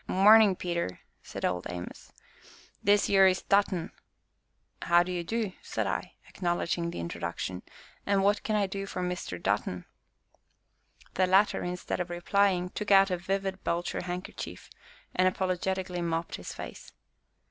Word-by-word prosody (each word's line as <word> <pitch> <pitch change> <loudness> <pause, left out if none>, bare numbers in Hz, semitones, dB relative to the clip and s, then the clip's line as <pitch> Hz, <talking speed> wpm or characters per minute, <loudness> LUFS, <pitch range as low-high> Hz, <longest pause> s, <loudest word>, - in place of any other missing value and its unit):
"Marnin', 210 +1 +6
Peter!" 170 - -3 0.2
said - - -5
Old 90 -1 -1
Amos, 90 0 -8 0.7
"this 205 +1 +4
yere 195 -1 +6
is 185 - -1
Dutton." 195 -4 +1 0.9
"How 175 +1 +4
do 180 - -5
you 175 -1 -2
do?" 215 +1 -2
said - - -3
I, - - -3
acknowledging 175 -1 -1
the - - -6
introduction, 85 +2 -4 0.4
"and 200 -1 +2
what 205 +2 +3
can 215 - -1
I 205 -1 +2
do 195 +1 -5
for 185 - -4
Mr. 180 - -4
Dutton?" 90 -2 -1 1.3
The 185 0 +2
latter, 195 +3 +3
instead 180 +1 -3
of 180 -1 -2
replying, 180 +1 +1
took 210 - -4
out 195 -1 +6
a 180 - +1
vivid 195 +1 -3
belcher 170 +1 -1
handkerchief, 180 +1 -6 0.4
and 185 0 +3
apologetically 185 -1 -1
mopped 165 0 -2
his 90 - -7
face. - - -9
180 Hz, 145 wpm, -29 LUFS, 170-195 Hz, 1.3 s, Marnin